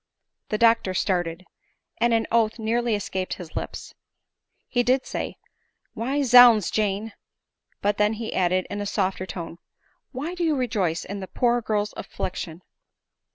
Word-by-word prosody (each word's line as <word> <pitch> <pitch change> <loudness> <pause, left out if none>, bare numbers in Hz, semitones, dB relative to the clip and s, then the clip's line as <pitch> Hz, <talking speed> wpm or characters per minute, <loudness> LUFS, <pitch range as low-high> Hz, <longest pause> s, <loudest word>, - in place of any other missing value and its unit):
The 215 - 0
doctor 225 -4 +3
started; 175 -2 -1 0.5
and 235 +1 +3
an 225 -1 +2
oath 225 -1 +2
nearly 230 0 0
escaped 190 -2 -3
his 175 -4 -11
lips. - - -6 0.7
He 245 - +1
did 255 +2 +2
say, - - -4 0.3
" - - -48
Why, 270 +5 -1
zounds, 245 -5 +7
Jane! 210 0 -1 0.2
— - - -60
" - - -43
but 205 0 +1
then 210 +1 +3
he 220 0 -5
added, 185 0 +1
in 205 0 -3
a 205 - -3
softer 190 -2 -1
tone, 170 -1 -7 0.3
" - - -42
why 295 +7 -4
do 355 -1 -3
you 315 -3 +2
rejoice 205 - -1
in 200 +1 -5
the 190 - -6
poor 240 +2 +1
girl's 210 -1 -1
affliction 175 -1 -5
215 Hz, 165 wpm, -25 LUFS, 185-235 Hz, 0.7 s, zounds